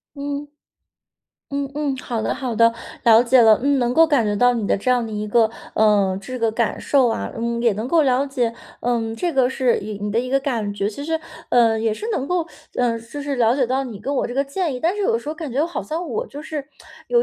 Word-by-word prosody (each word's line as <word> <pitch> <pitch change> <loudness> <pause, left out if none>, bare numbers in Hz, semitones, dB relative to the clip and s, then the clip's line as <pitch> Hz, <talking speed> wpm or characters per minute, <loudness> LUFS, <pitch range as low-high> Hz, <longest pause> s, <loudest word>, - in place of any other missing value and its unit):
嗯。 285 +1 -4 1.0
嗯 280 -1 -2
嗯， 290 -2 -1
好 235 -3 -3
的 - - -1
好 255 -3 -4
的， 230 0 +5 0.3
了 230 0 +7
解 250 +1 +5
了， 220 -1 +6
嗯。 280 0 +2
能 245 -1 +1
够 325 +3 +7
感 285 -8 +2
觉 205 - 0
到 245 +4 +4
你 225 -3 -2
的 - - +2
这 205 +6 -1
样 245 -2 +2
的 220 - -7
一 210 0 -3
个， 225 +1 +4 0.3
呃， 200 -3 +3
这 255 +6 -6
个 230 -1 +1
感 225 0 -1
受 270 -3 +3
啊。 225 - -2
嗯， 235 +1 -2
也 235 - +4
能 220 +4 -3
够 325 +3 +3
了 265 0 +2
解， 250 -4 -1 0.3
嗯， 230 -2 -1
这 345 +9 -1
个 260 -3 +3
是 260 -2 +1
一 215 +1 -6
你 205 0 -3
的 225 - +1
一 255 - -1
个 275 - +2
感 230 -7 -2
觉。 200 0 -1
其 280 +7 -7
实， 320 0 -1 0.3
呃， 230 -2 +4
也 220 -1 0
是 430 - -6
能 275 -10 -1
够， 355 +1 0 0.3
呃， 235 -2 +1
就 230 +6 -8
是 280 -1 -2
了 235 0 +3
解 270 - +2
到 265 +3 0
你 225 -6 -8
跟 270 +6 -3
我 - - +1
这 - - -6
个 275 - +2
建 295 +1 -2
议， 250 - -6
但 350 +5 +1
是 415 - -1
有 460 +3 +2
时 - - -9
候 305 - -3
感 305 -5 -6
觉 280 +5 +1
好 340 - -4
像 330 +2 -4
我 470 +3 -3
就 295 -8 -9
是 300 -3 -5 0.4
有 480 -1 +3
250 Hz, 275 characters per minute, -21 LUFS, 225-285 Hz, 1.0 s, 了